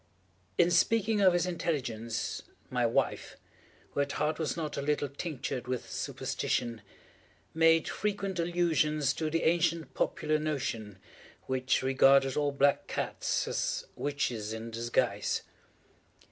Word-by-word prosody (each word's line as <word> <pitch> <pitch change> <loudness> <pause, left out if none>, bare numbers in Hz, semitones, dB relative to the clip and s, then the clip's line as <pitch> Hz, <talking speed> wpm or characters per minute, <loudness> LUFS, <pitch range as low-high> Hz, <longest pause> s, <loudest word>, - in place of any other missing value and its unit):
In 175 0 +4
speaking 215 +4 +3
of 185 -2 +6
his 175 0 +2
intelligence, 130 -10 -2 0.3
my - - +2
wife, - - -1 0.5
who - - -3
at 140 0 0
heart 155 +1 -1
was 160 +1 -1
not 155 -2 -3
a - - -2
little 145 0 0
tinctured 135 -3 -4
with 125 -1 -3
superstition, 115 -2 -2 0.7
made 165 0 +4
frequent 200 -3 -2
allusion 165 -3 +1
to 150 +3 0
the 165 +1 0
ancient 165 -2 +1
popular 155 0 0
notion, 125 -9 -3 0.5
which 130 0 0
regarded 135 0 +5
all 145 -1 +1
black 140 0 +2
cats - - -1
as - - -1
witches 120 -7 -2
in 115 +1 -6
disguise. 115 +1 0
150 Hz, 125 wpm, -30 LUFS, 130-165 Hz, 0.7 s, of